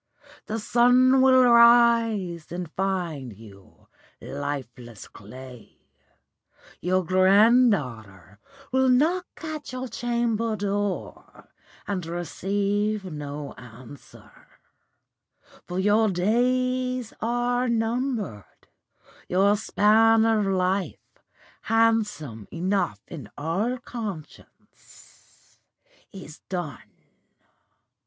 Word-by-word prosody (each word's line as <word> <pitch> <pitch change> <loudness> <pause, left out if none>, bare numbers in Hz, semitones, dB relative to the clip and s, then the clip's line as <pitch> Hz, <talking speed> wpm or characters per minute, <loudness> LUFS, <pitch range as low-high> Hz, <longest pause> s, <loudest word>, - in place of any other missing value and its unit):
The 220 - -3
sun 250 +4 +4
will 260 -1 +6
rise 235 -7 +4
and 175 -2 -6
find 170 - -3
you 100 -3 -17 0.3
lifeless 130 -6 -7
clay; 125 +3 -13 1.0
your 185 +1 0
granddaughter 185 - +2 0.3
will 260 0 +2
knock 325 +9 +2 0.2
at 310 -3 -6
your 255 0 -5
chamber 230 -1 -1
door 205 -1 -4 0.4
and 195 -3 -3
receive 200 +5 -2
no 150 -3 -7
answer; 125 +2 -14 1.4
for 180 - -5
your 210 +3 +3
days 250 +5 0
are 245 +2 0
numbered, 225 - -3 0.6
your 195 +3 +3
span 220 +1 +3
of 220 -3 +2
life, 190 0 0 0.7
handsome 210 - 0
enough 175 - -1
in 145 - -9
all 190 +12 -2
conscience, 215 -10 -12 0.5
is 175 -6 -11
done. 175 -9 -6
200 Hz, 80 wpm, -25 LUFS, 155-235 Hz, 1.4 s, will